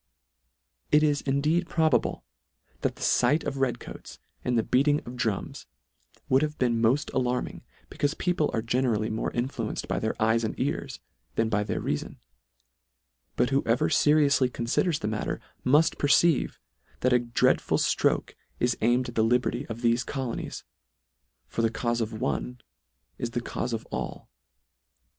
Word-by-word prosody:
It 150 +1 +5
is 145 -2 +2
indeed 150 +5 +1
probable, 155 -8 +1 0.6
that - - -1
the - - -8
fight 140 +6 +3
of 135 - -3
red 135 -2 0
coats, - - -10 0.3
and 125 -1 +1
the 115 - +2
beating 145 +5 +3
of 120 - -7
drums 110 -5 -3 0.6
would 130 +1 +4
have 155 0 -2
been 120 -2 +1
mod 125 +6 +2
alarming, 125 -1 -1 0.3
becaufe 145 +2 -1
people 180 -4 +1
are 110 - -1
generally 115 -3 0
more 110 - -1
influenced 120 -3 -3
by - - -1
their 110 - -2
eyes 110 +1 +2
and 110 - -3
ears - - -2 0.4
than 115 0 +1
by 105 -1 +1
their - - -2
reafon: - - -3 1.2
But 125 - +1
who 135 +1 +3
ever 115 +1 +2
ferioufly 145 -3 +4
conliders 135 +8 0
the - - -1
matter, 110 0 -2 0.2
muff 150 +5 +4
perceive, 150 +2 +3 0.4
that 125 0 +3
a 125 - +5
dreadful 120 -1 +2
flroke - - +1 0.3
is 120 0 +2
aimed 120 +2 +2
at - - -9
the 110 - +2
liberty 125 +3 +1
of 115 0 -6
thefe 120 +1 +2
colonies: 130 -4 -4 0.8
For - - -2
the 115 - +3
caufe 120 +1 -1
of 110 -1 -3
one 125 +2 -2 0.6
is 120 - -2
the 120 +1 -2
caufe 120 +1 -3
of 115 -1 -3
all. - - -5
125 Hz, 155 wpm, -27 LUFS, 115-140 Hz, 1.2 s, It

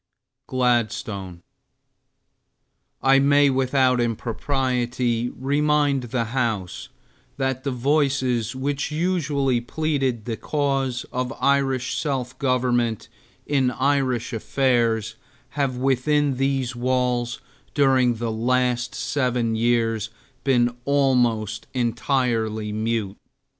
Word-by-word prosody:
GLADSTONE 110 -8 -1 1.6
I 135 0 +5
may 140 0 +4
without 130 -1 +2
impropriety 120 0 -1
remind 145 +1 +1
the 120 0 -1
House 110 -8 -2 0.5
that 130 -1 -1
the 140 - -1
voices 130 -3 0
which 140 +2 -2
usually 150 -6 0
pleaded 135 -4 -1
the 115 -2 -3
cause 135 -4 -1
of 125 0 -2
Irish 135 -2 +1
self 130 -4 -2
government 125 -4 0 0.4
in 135 -3 +2
Irish 130 -2 0
affairs 115 -1 0 0.3
have 135 -3 -1
within 135 +2 +1
these 135 -2 0
walls 125 -2 0 0.4
during 130 -4 +3
the 115 0 -3
last 125 +2 0
seven 125 -3 0
years 115 -2 +1 0.3
been 120 -3 +2
almost 125 -6 +1
entirely 115 -3 0
mute. 110 -2 -2
125 Hz, 90 wpm, -23 LUFS, 120-135 Hz, 1.6 s, I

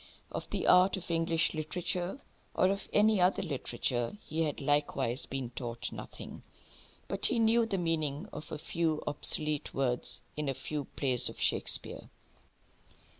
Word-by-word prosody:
Of - - -5
the - - -2
art 185 +2 +5
of 180 -2 -6
English 165 0 +1
literature, 175 - -2 0.4
or 185 - +3
of 200 0 -3
any 210 -1 +4
other 180 +2 +2
literature, 125 - -2
he 160 +1 -2
had 150 -3 -1
likewise 140 -3 0
been 130 -3 -5
taught 120 -2 -5
nothing. - - -9 0.7
But - - +1
he - - 0
knew 225 0 +3
the 195 - -1
meaning 165 -1 -1
of 155 - -8
a - - -4
few 160 0 -1
obsolete 150 0 +4
words 125 -2 -1
in 150 -2 -2
a 135 - -2
few 150 +1 -5
plays 130 -4 0
of - - -11
Shakespeare. - - +1
155 Hz, 150 wpm, -31 LUFS, 135-180 Hz, 0.7 s, art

